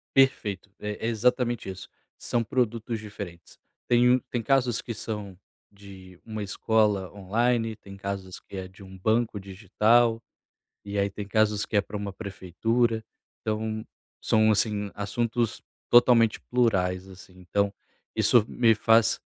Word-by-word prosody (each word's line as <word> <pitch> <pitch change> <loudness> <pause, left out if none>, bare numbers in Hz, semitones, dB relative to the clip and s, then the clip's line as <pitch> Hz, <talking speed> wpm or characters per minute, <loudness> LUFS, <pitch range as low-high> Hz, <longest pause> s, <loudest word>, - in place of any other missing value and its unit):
Perfeito 105 -8 +2
é 105 0 -4
é - - +1
exatamente 120 -1 +1
isso 95 0 -8 0.3
são 120 - -1
produtos 115 -1 -1
diferentes. 100 -5 -9 0.3
Tem 120 0 +5
um 130 - +4
tem 120 - -2
casos 125 -2 +2
que 115 - -5
são 105 -4 -6 0.3
de 95 -3 -14
uma 110 -2 -5
escola 105 -2 +1
online, 115 +3 0
tem 100 -2 -13
casos 95 -2 -5
que - - -13
é 95 -1 -5
de 95 +1 -15
um 95 0 -12
banco 110 +1 +1
digital, 110 +4 +2 0.6
e 100 0 -4
aí 100 0 +2
tem 100 +1 -7
casos 105 -1 +2
que - - -11
é - - +6
pra 105 - -7
uma 100 -1 -4
prefeitura. 110 +4 -1 0.4
Então 110 0 -2 0.4
são 110 0 +3
assim, 105 -1 0
assuntos 115 +3 -1 0.3
totalmente 120 -2 +6
plurais, 95 -7 +1
assim, 95 0 -14
então, 100 +3 0 0.4
isso 110 +1 +4
me 115 -2 +4
faz, 115 0 +3
105 Hz, 145 wpm, -26 LUFS, 100-115 Hz, 0.6 s, é